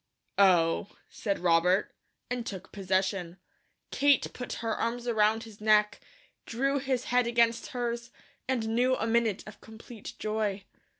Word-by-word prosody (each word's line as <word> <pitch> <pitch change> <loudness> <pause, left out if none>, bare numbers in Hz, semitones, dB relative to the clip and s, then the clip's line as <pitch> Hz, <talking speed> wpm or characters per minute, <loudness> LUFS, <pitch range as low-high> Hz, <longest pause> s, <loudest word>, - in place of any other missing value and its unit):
"Oh," 180 -1 +3
said 200 -3 -2
Robert, 180 +3 +2 0.3
and 245 -1 -3
took 190 -5 -7
possession. 190 -2 -1 0.5
Kate 285 -1 +3
put 250 - -6
her 225 -1 0
arms 240 +1 -2
around 220 -1 +2
his 220 -2 -13
neck, 210 -1 +3 0.5
drew 275 +4 0
his 260 -2 -1
head 250 -1 +4
against 235 -1 +2
hers, 235 -1 -3 0.4
and 240 -4 -1
knew 250 +3 +2
a 225 - -2
minute 225 -3 +1
of 215 - -12
complete 220 0 -11
joy. 215 -2 -2
220 Hz, 135 wpm, -29 LUFS, 200-240 Hz, 0.5 s, head